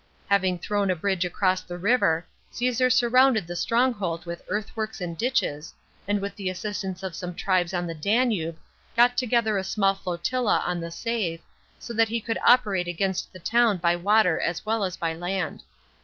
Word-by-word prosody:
Having 190 -2 +3
thrown 200 +2 -1
a 185 - +2
bridge 190 +1 0
across 185 +1 +1
the 175 - -8
river, 175 -5 +2 0.2
Caesar 250 +1 +1
surrounded 250 -3 +4
the 175 +1 -6
stronghold 205 -5 0
with 170 0 -6
earthworks 215 +2 -3
and 175 -2 -4
ditches, 165 - -1 0.3
and 205 0 +1
with 200 +1 -5
the 195 -3 -3
assistance 190 0 -4
of 190 -2 -4
some 180 -1 -6
tribes 185 -2 +1
on 175 -1 -2
the 165 - -4
Danube, 195 -2 0 0.4
got 240 +1 +5
together 235 -4 +1
a - - -3
small 195 0 +2
flotilla 195 +6 -1
on 180 -1 -1
the 170 0 -5
Save, 175 -3 -2 0.4
so 235 - -8
that 225 0 +3
he 230 +1 -1
could 225 +1 -3
operate 200 -8 +4
against 185 +2 -2
the - - -11
town 230 +2 +2
by 170 0 +2
water 185 -1 +3
as 170 +3 -2
well 220 -1 0
as 185 -1 -3
by 165 -1 -1
land. 175 0 -3
195 Hz, 180 wpm, -25 LUFS, 175-225 Hz, 0.4 s, got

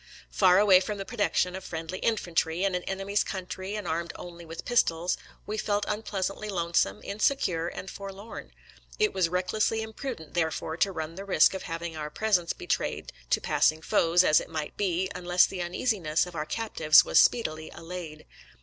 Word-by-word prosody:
Far 185 -2 +5
away 195 -2 +7
from 205 +2 -4
the 195 - -5
protection 200 -5 0
of 190 - -7
friendly 165 +2 -5
infantry, 175 -5 0
in 195 -1 +1
an 180 - -1
enemy's 195 +1 -1
country 190 +1 -5
and 210 -4 -5
armed 165 +1 -2
only 170 -1 -10
with 165 0 -8
pistols, 175 -8 +2 0.3
we 215 +1 -3
felt 205 -1 0
unpleasantly 210 -1 -3
lonesome, 170 - 0
insecure, 200 -6 0
and 185 - -7
forlorn. 195 +3 -8 0.5
It 425 -1 +2
was 180 -3 +1
recklessly 210 +5 0
imprudent, 220 - -7
therefore, 160 -1 -1
to 195 - +2
run 160 -2 -5
the 195 +3 -7
risk 185 -4 +5
of 190 - -4
having 165 0 -4
our 150 -1 -4
presence 185 -2 +1
betrayed - - -3 0.2
to - - +3
passing 155 +1 +2
foes, 170 +2 +4
as 155 -4 +5
it - - -8
might 155 -2 -4
be, 190 -2 0
unless 180 0 +3
the 190 - -6
uneasi 200 +6 -1
ness 155 +1 +1
of 180 - -10
our 155 -2 -4
captives 160 -7 +4
was - - +4
speedily 155 -10 +2
allayed. 165 -2 -8
180 Hz, 175 wpm, -28 LUFS, 165-200 Hz, 0.5 s, away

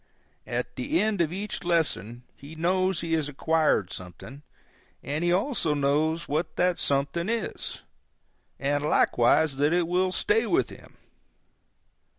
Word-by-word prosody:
At - - -4
the 310 +3 0
end 215 -4 +1
of 165 -2 +1
each 200 +2 -5
lesson 140 - -1
he 145 +3 -12
knows 185 +2 +1
he 165 -1 -2
has 155 -3 0
acquired 150 - +1
something, 90 - -10 0.6
and 150 +4 -2
he 175 - +2
also 180 - +1
knows 155 +4 +1
what 155 +4 -2
that 180 -1 +1
something 145 +7 0
is, 230 -3 -4 0.7
and 145 +1 -1
likewise 150 0 +3
that 145 +3 +2
it 175 -1 +2
will 185 +1 +1
stay 425 - +1
with - - +1
him. - - -15
160 Hz, 140 wpm, -26 LUFS, 145-180 Hz, 0.7 s, likewise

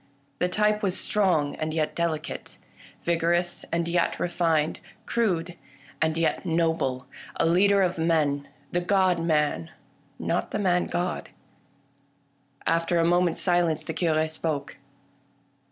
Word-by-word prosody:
The 180 - +1
type 210 +2 +1
was 190 -3 +1
strong 175 -9 +1
and 155 0 -3
yet 155 -2 0
delicate; 165 -2 -3 0.5
vigorous 170 +1 0
and 170 0 0
yet 170 0 0
refined; 165 -3 +1 0.3
crude 180 -7 0 0.5
and 160 0 +1
yet 165 -1 0
noble; 160 -7 0 0.3
a - - +1
leader 195 +4 +4
of 180 -2 -1
men 150 -4 +1
— 145 - -32
the 175 - 0
God 185 -1 +2
Man, 160 0 0 0.5
not 175 - -1
the - - -2
Man 180 -3 +1
God. 175 +1 -2 1.4
After 165 +1 +1
a 165 - +3
moment's 175 0 +2
silence 175 -3 +2
the 160 - -4
Cure 160 -1 +1
spoke. 155 -2 -3
170 Hz, 130 wpm, -26 LUFS, 160-180 Hz, 1.4 s, leader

